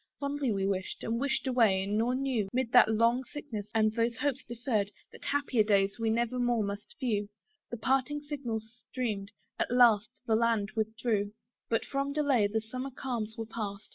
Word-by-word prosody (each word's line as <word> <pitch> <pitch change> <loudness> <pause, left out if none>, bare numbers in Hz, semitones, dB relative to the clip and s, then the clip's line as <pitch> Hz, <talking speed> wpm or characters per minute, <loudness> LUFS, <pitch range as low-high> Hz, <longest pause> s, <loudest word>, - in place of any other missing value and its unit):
Fondly 280 -3 -1
we 195 -2 0
wished, 190 -1 -2
and 230 +1 -1
wished 280 +1 0
away, 225 -7 +3
nor 220 +5 +1
knew, 255 -7 0
'Mid 250 -2 -1
that 245 -3 +7
long 230 +3 +3
sickness, 235 -6 -6
and 215 -1 +3
those 230 0 0
hopes 285 -1 -1
deferr'd, 235 -4 -1 0.2
That - - -13
happier 280 -5 +2
days 200 0 +2
we 225 -1 +1
never 235 +2 0
more 240 -2 +2
must 200 0 -5
view: 210 -6 0 0.4
The 240 - -4
parting 270 +5 +1
signal 275 -7 -3
streamed, 220 -2 -5 0.3
at - - +1
last 235 -3 +5 0.2
the 225 - +1
land 225 -2 +2
withdrew, 220 -1 -1 0.4
But 225 0 +1
from 275 0 -2
delay 280 -8 +3
the 220 +2 -1
summer 255 +5 -5
calms 240 -4 -4
were 225 - -3
past. 215 -2 -5
230 Hz, 175 wpm, -30 LUFS, 215-255 Hz, 0.4 s, that